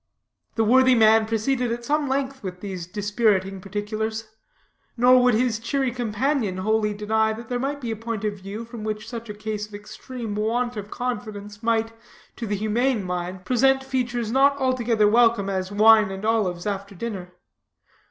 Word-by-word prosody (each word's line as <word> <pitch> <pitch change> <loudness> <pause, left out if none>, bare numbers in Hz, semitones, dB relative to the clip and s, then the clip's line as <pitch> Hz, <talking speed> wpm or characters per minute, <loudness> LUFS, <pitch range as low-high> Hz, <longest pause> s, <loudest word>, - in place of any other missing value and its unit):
The 225 - +2
worthy 260 +3 +5
man 220 -1 +5
proceeded 240 +2 0
at 235 0 -4
some 295 +2 +1
length 270 0 -2
with 185 -3 -6
these 185 -4 -6
dispiriting 205 -1 0
particulars. 215 +3 -4 0.7
Nor 250 +1 +6
would 250 -2 +4
his 230 -1 +1
cheery 265 +2 -1
companion 235 -2 -1
wholly 210 +2 0
deny 220 +1 +1
that 225 +1 -9
there 245 -1 -1
might 280 +3 -2
be 240 -4 -4
a - - -2
point 225 -1 -5
of 210 -1 -2
view 200 +4 -7
from 230 -2 -9
which 215 0 -4
such 230 -2 -7
a - - -4
case 210 0 -4
of 210 - -11
extreme 225 +2 -7
want 235 +4 -1
of 205 -1 -6
confidence 215 -5 -5
might, 225 -1 +1 0.4
to 230 - -5
the 205 - -1
humane 220 +3 0
mind, 180 0 -4
present 265 +3 +3
features 245 -4 -2
not 275 +2 +4
altogether 240 -5 +2
welcome 225 -3 +3
as 190 0 -2
wine 215 0 +6
and 195 +2 -6
olives 200 -6 0
after 200 -1 -4
dinner. 185 -3 -6
220 Hz, 170 wpm, -24 LUFS, 205-245 Hz, 0.7 s, Nor